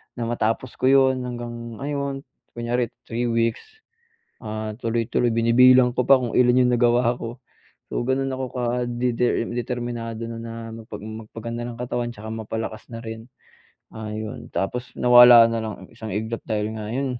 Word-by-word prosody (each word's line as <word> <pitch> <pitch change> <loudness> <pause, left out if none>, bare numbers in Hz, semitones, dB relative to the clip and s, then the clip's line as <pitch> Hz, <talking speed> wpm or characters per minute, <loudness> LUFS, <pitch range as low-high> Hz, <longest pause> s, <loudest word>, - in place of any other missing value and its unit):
na 120 - -3
matapos 115 +1 -1
ko - - 0
'yon 135 -1 +4
hanggang, 120 -1 -6
ayon 140 -1 -3 0.3
kunyari 120 0 -1 0.2
3 120 +1 -2
weeks, 115 0 +1 0.8
ah, 110 0 -4
tuloy-tuloy. 115 +1 0
Binibilang 125 +2 +5
ko 125 - +2
pa 135 - +8
kung 120 -2 -3
ilan 125 0 +5
yung - - +2
nagawa 120 0 +3
ko, 115 +1 -7 0.5
so - - -1
ganun 135 +1 0
ako 130 -1 -4
kadeter 120 -1 0
determinado 120 -1 -4
no'n 115 0 -6
na 115 - -7 0.2
magpa 110 -1 -10
magpaganda 110 +2 -6
ng 120 - -6
katawan 120 -1 -2
tsaka 110 +1 -8
mapalakas 110 0 -5
na 115 - -6
rin, 110 0 -7 0.7
ah, 110 -1 -6
yun. 110 +2 -6
Tapos 125 +6 -2
nawala 120 -1 +9
na 115 - -1
lang 110 -1 -4
ng - - -24
isang 110 -1 -8
iglap 110 +2 -3
dahil 105 0 -1
nga 105 -1 -5
yun 130 +1 -2
120 Hz, 160 wpm, -23 LUFS, 115-125 Hz, 0.8 s, nawala